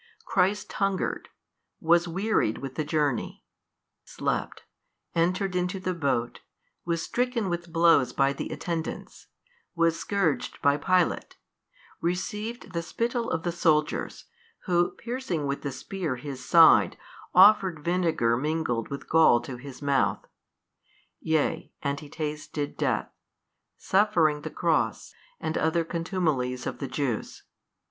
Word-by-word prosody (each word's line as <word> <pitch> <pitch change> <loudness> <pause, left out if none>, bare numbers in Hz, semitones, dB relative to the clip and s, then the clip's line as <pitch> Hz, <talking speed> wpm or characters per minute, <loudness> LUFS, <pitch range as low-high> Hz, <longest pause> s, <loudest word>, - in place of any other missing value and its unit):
Christ 200 +3 +1
hungered, 195 -2 -1 0.5
was 170 +1 +3
wearied 185 - 0
with 135 -1 -6
the 155 - -2
journey, 150 -4 -1 0.6
slept, - - -3 0.5
entered 180 +3 0
into 180 +1 -1
the 185 0 -2
boat, 135 -8 -1 0.5
was 170 -1 -1
stricken 245 -4 -1
with 170 0 -4
blows 165 -5 +4
by 135 0 +2
the - - -5
attendants, 165 -2 -5 0.5
was 165 -1 +2
scourged 195 -7 -1
by 140 0 +3
Pilate, 180 +3 0 0.6
received 210 +4 -3
the 170 - -1
spittle 230 +6 -2
of 160 - -2
the 175 - -1
soldiers, 155 -3 0 0.4
who 175 -2 +2
piercing 235 - -4
with 140 0 -2
the 140 - -3
spear 165 +1 -4
His 130 0 -7
Side, 165 +2 +6 0.4
offered 190 -5 +6
vinegar 165 -10 +2
mingled 135 -4 -1
with 140 - -6
gall 160 -7 +5
to 125 +1 -7
His 135 +2 -10
Mouth: 140 -2 +1 0.9
yea 160 +1 0
and 140 0 -1
He 150 - -11
tasted 150 -1 -4
death, - - -1 0.7
suffering 175 -7 +2
the - - -5
Cross - - 0 0.3
and 160 - -3
other 160 +1 +1
contumelies 160 -8 -1
of - - -4
the 135 - -3
Jews. 130 -3 -3
165 Hz, 125 wpm, -27 LUFS, 145-185 Hz, 0.9 s, Side